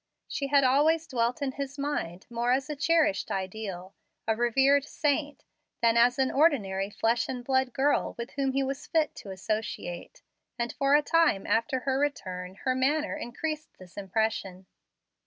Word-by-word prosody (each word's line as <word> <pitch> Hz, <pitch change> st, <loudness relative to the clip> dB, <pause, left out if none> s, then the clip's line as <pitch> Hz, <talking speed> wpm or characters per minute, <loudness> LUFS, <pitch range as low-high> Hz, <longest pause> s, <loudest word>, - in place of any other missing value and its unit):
She 280 Hz, -, -3 dB
had 280 Hz, 0 st, +4 dB
always 305 Hz, +5 st, +3 dB
dwelt 245 Hz, 0 st, -1 dB
in 270 Hz, -, -1 dB
his 275 Hz, 0 st, -6 dB
mind, 275 Hz, -, -3 dB
more 235 Hz, +1 st, -1 dB
as 265 Hz, +3 st, 0 dB
a -, -, -3 dB
cherished 310 Hz, -, +2 dB
ideal, 190 Hz, -1 st, -5 dB, 0.3 s
a 220 Hz, -, +2 dB
revered 270 Hz, +4 st, +3 dB
saint, 290 Hz, 0 st, -1 dB, 0.4 s
than 230 Hz, 0 st, +4 dB
as 245 Hz, +1 st, +4 dB
an 265 Hz, -1 st, +2 dB
ordinary 205 Hz, -, +2 dB
flesh 230 Hz, +3 st, 0 dB
and 250 Hz, -2 st, -5 dB
blood 260 Hz, -1 st, +1 dB
girl 280 Hz, +4 st, +1 dB
with 235 Hz, 0 st, -6 dB
whom 270 Hz, -1 st, -1 dB
he 275 Hz, 0 st, +1 dB
was 270 Hz, 0 st, -4 dB
fit 315 Hz, -2 st, +1 dB
to 200 Hz, -, -9 dB
associate, 205 Hz, -, -4 dB, 0.3 s
and 235 Hz, -1 st, -2 dB
for 275 Hz, +1 st, +3 dB
a 295 Hz, -, +4 dB
time 325 Hz, -11 st, +3 dB
after 230 Hz, +3 st, +1 dB
her 265 Hz, 0 st, 0 dB
return 185 Hz, -11 st, -3 dB
her 260 Hz, -, +3 dB
manner 295 Hz, +4 st, +1 dB
increased 305 Hz, +3 st, -5 dB
this 180 Hz, -2 st, -15 dB
impression. 195 Hz, -2 st, -2 dB
260 Hz, 165 wpm, -28 LUFS, 220-285 Hz, 0.4 s, had